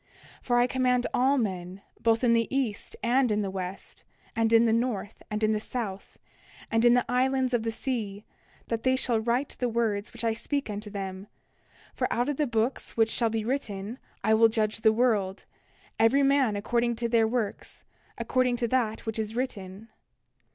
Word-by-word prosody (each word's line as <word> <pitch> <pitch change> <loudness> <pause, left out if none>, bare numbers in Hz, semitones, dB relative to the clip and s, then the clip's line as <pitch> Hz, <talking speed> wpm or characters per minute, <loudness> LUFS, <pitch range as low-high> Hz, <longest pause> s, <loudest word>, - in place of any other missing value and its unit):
29:11 - - -29
For 240 -1 +3
I 240 - +5
command 250 -1 +1
all 270 +3 +3
men, 190 -4 -3 0.2
both 225 +1 +2
in 235 -1 +4
the 230 -1 +2
east 260 -6 -2
and 245 0 +3
in 210 0 +1
the 195 - -3
west, 190 0 -7 0.3
and 225 -1 +1
in 230 0 +6
the 225 - +3
north, 230 -3 -2
and 210 +1 -3
in 215 - +3
the 215 - +1
south, 210 -3 -5 0.5
and 225 0 +2
in 240 0 +6
the 245 - +2
islands 260 0 +1
of 240 - +2
the 225 0 -2
sea, 220 -4 -4 0.4
that 230 -1 -1
they 260 +2 +2
shall 245 -3 +1
write 240 +5 -1
the 245 - 0
words 220 -3 -1
which - - -8
I 225 -1 +2
speak 275 +1 -3
unto 210 +1 -5
them; 195 -1 -6 0.7
for - - -2
out 245 +4 +1
of 290 - -2
the 300 - +1
books 230 +2 -2
which 225 0 +3
shall 230 -2 +1
be 220 -1 -2
written 225 -3 -3 0.2
I 220 - +3
will 225 +1 +6
judge 220 -1 -1
the 220 - +5
world, 215 -5 +1 0.5
every 270 +5 +4
man 275 -5 +3
according 235 +3 0
to 235 +1 -2
their 230 -1 +3
works, 225 -3 -3 0.3
according 255 -1 +1
to 240 -1 0
that 230 -4 0
which 225 0 -3
is 220 0 -3
written. 215 -4 -5
230 Hz, 195 wpm, -27 LUFS, 215-250 Hz, 0.7 s, in